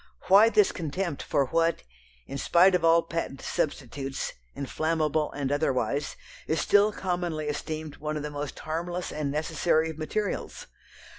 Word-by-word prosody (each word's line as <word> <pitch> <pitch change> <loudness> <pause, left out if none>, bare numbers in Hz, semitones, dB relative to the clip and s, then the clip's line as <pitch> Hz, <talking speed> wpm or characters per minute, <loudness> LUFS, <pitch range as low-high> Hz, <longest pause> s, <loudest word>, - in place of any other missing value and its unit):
Why 205 +4 +8
this 210 -2 +4
contempt 170 0 -3
for 140 - +1
what, 165 +4 +1 0.4
in 140 - -6
spite 180 +7 +5
of 180 -2 +2
all 165 0 +5
patent 165 -5 -4
substitutes, 135 -1 -3 0.2
inflammable 155 +2 0
and 140 -1 -2
otherwise, 140 -1 0 0.3
is 160 - +1
still 205 +1 +4
commonly 175 -6 -2
esteemed 155 +1 -4
one 150 0 -3
of 150 - -4
the 150 - -4
most 145 0 -5
harmless 175 +3 -3
and 150 -2 -2
necessary 160 +2 +1
of 160 - -11
materials? 205 +6 -3
155 Hz, 145 wpm, -27 LUFS, 145-170 Hz, 0.4 s, Why